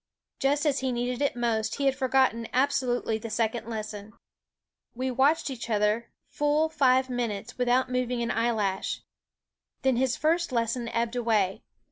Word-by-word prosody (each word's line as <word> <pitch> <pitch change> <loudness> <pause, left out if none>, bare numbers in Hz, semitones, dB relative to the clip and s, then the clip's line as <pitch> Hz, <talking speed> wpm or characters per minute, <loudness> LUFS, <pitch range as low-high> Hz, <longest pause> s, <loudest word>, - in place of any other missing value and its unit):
Just 285 +3 +1
as 280 -2 +2
he 265 -1 -1
needed 245 +1 -2
it 285 - +1
most, 225 -3 0
he 280 - -2
had 270 -1 +3
forgotten 260 -3 +2
abso 260 0 +2
lutely 240 -2 0
the 230 +1 -6
second 225 +1 -1
lesson. 215 -2 -6 0.8
We 260 +2 -2
watched 275 +4 +2
each 235 -2 -6
other 210 +1 +1 0.2
full 295 +2 +1
five 260 -4 +3
minutes 235 -2 -4
without 250 +1 +3
moving 250 -1 0
an 235 - -1
eyelash. 220 -4 -1 0.8
Then 265 -2 +3
his 260 0 +1
first 335 +2 +1
lesson 235 0 -1
ebbed 230 +1 -1
away. 215 -6 +1
245 Hz, 155 wpm, -27 LUFS, 230-265 Hz, 0.8 s, had